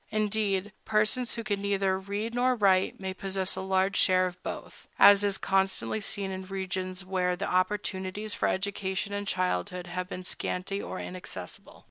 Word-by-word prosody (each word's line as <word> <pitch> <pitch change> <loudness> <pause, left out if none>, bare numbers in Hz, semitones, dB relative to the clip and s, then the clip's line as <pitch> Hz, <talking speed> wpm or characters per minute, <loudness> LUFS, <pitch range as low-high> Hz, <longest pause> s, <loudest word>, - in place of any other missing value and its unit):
Indeed, 210 -2 0
persons 215 +3 +1
who 230 - -4
can 205 -2 -1
neither 195 -1 +1
read 205 +4 -3
nor 250 +1 +3
write 195 -4 +3
may 190 -1 -3
possess 190 0 -2
a 190 - -3
large 190 +1 +1
share 185 -1 +4
of 180 0 -5
both, - - -7
as 205 0 +8
is 200 -1 +2
constantly 195 +2 +1
seen 200 -1 -1
in 190 0 -6
regions 185 -1 -3
where 180 -1 +1
the 195 +3 -3
opportunities 190 +2 -1
for - - +1
education 195 +1 -1
in 205 0 -3
childhood 180 0 -1
have 180 +1 -4
been 180 - -5
scanty 185 +2 -3
or - - -5
inaccessible. 95 - -7
190 Hz, 165 wpm, -29 LUFS, 185-205 Hz, -, as